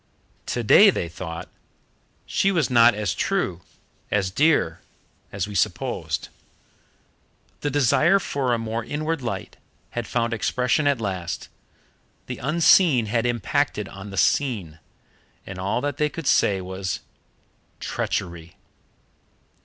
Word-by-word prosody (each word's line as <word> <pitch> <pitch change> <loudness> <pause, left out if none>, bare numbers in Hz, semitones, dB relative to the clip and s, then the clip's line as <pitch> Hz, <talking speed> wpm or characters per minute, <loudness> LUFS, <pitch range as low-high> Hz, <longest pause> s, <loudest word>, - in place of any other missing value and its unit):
Today 125 - +6
they 90 - -1
thought: 85 0 -7 0.8
"She 195 - +1
was 165 -8 +1
not 120 -2 +6
as 105 -4 -1
true, 95 - -1 0.5
as 100 -3 0
dear, 145 - +2 0.5
as 100 -1 -3
we 105 - -8
supposed." 95 - -1 1.3
The 145 - -1
desire 145 - +4
for 140 -9 -1
a 120 - +2
more 115 0 -3
inward 155 +4 -3
light 120 - -5 0.3
had 120 -1 -4
found 115 -1 0
expression 125 +6 +1
at 140 -4 +2
last, 90 -6 -4 0.8
the - - -6
unseen 155 -2 +4
had 115 +2 0
impacted 120 -2 -1
on 100 +1 -9
the 95 - -8
seen, 100 - +1 0.7
and 95 -1 -8
all 100 +6 -1
that 145 0 -2
they 150 +1 +1
could 165 0 -7
say 100 -7 +3
was 95 0 -4 0.8
"Treachery." 85 -1 -4
115 Hz, 120 wpm, -24 LUFS, 95-145 Hz, 1.3 s, Today